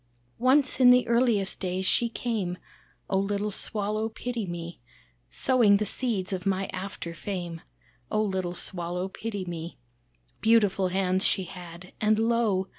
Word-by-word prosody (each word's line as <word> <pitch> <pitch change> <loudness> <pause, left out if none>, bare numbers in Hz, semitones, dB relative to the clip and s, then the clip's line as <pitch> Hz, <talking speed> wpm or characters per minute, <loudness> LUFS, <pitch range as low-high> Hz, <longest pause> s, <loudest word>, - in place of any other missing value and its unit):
"Once 260 +3 +4
in 250 -1 +8
the 250 -1 +6
earliest 230 -5 +2
days 185 0 -2
She 235 +4 +2
came, 215 -7 -2 0.5
Oh 190 - +1
little 205 +1 -1
Swallow 215 +2 -2
pity 235 -2 -4
me, 170 0 -6 0.5
Sowing 225 - +4
the 210 +1 +1
seeds 205 -4 -2
of 185 -1 -3
my 195 0 +1
after 185 -3 -5
fame, 175 -2 -5 0.5
Oh 215 - +1
little 185 -3 -2
Swallow 180 +1 -3
pity 205 -1 -5
me. 170 -1 -6 0.6
Beautiful 205 -4 +3
hands 185 0 +1
she 190 - +2
had, 180 0 -10
and 215 0 +3
lo! 225 -4 +2
195 Hz, 140 wpm, -27 LUFS, 180-225 Hz, 0.6 s, in